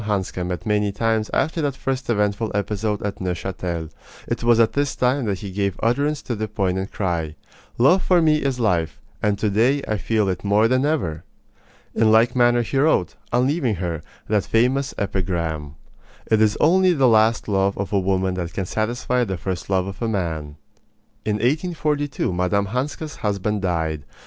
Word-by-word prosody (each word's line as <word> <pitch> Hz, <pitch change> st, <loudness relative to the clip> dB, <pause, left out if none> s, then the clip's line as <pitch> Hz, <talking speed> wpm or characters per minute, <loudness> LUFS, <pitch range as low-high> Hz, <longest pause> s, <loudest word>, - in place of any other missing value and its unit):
Hanska 95 Hz, -3 st, -2 dB
met 90 Hz, 0 st, -4 dB
many 105 Hz, -1 st, +1 dB
times 110 Hz, +1 st, 0 dB
after 160 Hz, +2 st, 0 dB
that 145 Hz, -3 st, -1 dB
first 130 Hz, -2 st, -3 dB
eventful 105 Hz, 0 st, 0 dB
episode 105 Hz, 0 st, -1 dB
at 100 Hz, -1 st, -4 dB
Neuchatel. 90 Hz, -3 st, -3 dB, 0.4 s
It -, -, -3 dB
was 120 Hz, -1 st, +4 dB
at 115 Hz, -1 st, +4 dB
this 145 Hz, -1 st, 0 dB
time 125 Hz, +1 st, +1 dB
that 100 Hz, -3 st, -2 dB
he 100 Hz, -, -6 dB
gave 100 Hz, -1 st, -2 dB
utterance 140 Hz, +6 st, +1 dB
to 120 Hz, -, -3 dB
the 110 Hz, 0 st, -3 dB
poignant 95 Hz, -2 st, -2 dB
cry: 85 Hz, -5 st, -2 dB, 0.4 s
Love 140 Hz, +11 st, +5 dB
for 180 Hz, -1 st, +3 dB
me 155 Hz, -2 st, +4 dB
is 135 Hz, -4 st, -1 dB
life, 90 Hz, -8 st, 0 dB, 0.2 s
and 105 Hz, -1 st, +1 dB
to 105 Hz, 0 st, 0 dB
day 125 Hz, +7 st, +2 dB
I 110 Hz, -, 0 dB
feel 110 Hz, -1 st, +1 dB
it 95 Hz, -2 st, -2 dB
more 105 Hz, +2 st, +3 dB
than 130 Hz, +3 st, +2 dB
ever! 85 Hz, -, -1 dB, 0.7 s
In 110 Hz, -1 st, +3 dB
like 115 Hz, +3 st, +4 dB
manner 120 Hz, -1 st, +4 dB
he 135 Hz, +4 st, -1 dB
wrote, 135 Hz, -, +2 dB, 0.2 s
on 125 Hz, +1 st, +3 dB
leaving 135 Hz, -6 st, 0 dB
her, 85 Hz, -3 st, -3 dB, 0.3 s
that 105 Hz, -2 st, +1 dB
famous 130 Hz, +4 st, +1 dB
epigram: 85 Hz, -7 st, -2 dB, 0.5 s
It 110 Hz, -1 st, +2 dB
is 110 Hz, -1 st, +3 dB
only 185 Hz, +3 st, +4 dB
the 135 Hz, -5 st, +3 dB
last 110 Hz, 0 st, +3 dB
love 100 Hz, -1 st, +1 dB
of 100 Hz, +1 st, -4 dB
a 100 Hz, -, +4 dB
woman 95 Hz, 0 st, 0 dB
that 90 Hz, -2 st, -4 dB
can 95 Hz, -, -2 dB
satisfy 120 Hz, +5 st, -1 dB
the 95 Hz, -5 st, -3 dB
first 90 Hz, 0 st, -4 dB
love 95 Hz, -2 st, +1 dB
of 95 Hz, +3 st, -8 dB
a 115 Hz, -, 0 dB
man. 80 Hz, -8 st, -3 dB, 0.7 s
In 105 Hz, -, +1 dB
1842 145 Hz, -, -1 dB
Mme. 90 Hz, +3 st, +1 dB
Hanska's 135 Hz, +8 st, -4 dB
husband 105 Hz, 0 st, -1 dB
died. 80 Hz, -5 st, -1 dB
105 Hz, 180 wpm, -22 LUFS, 95-125 Hz, 0.7 s, Love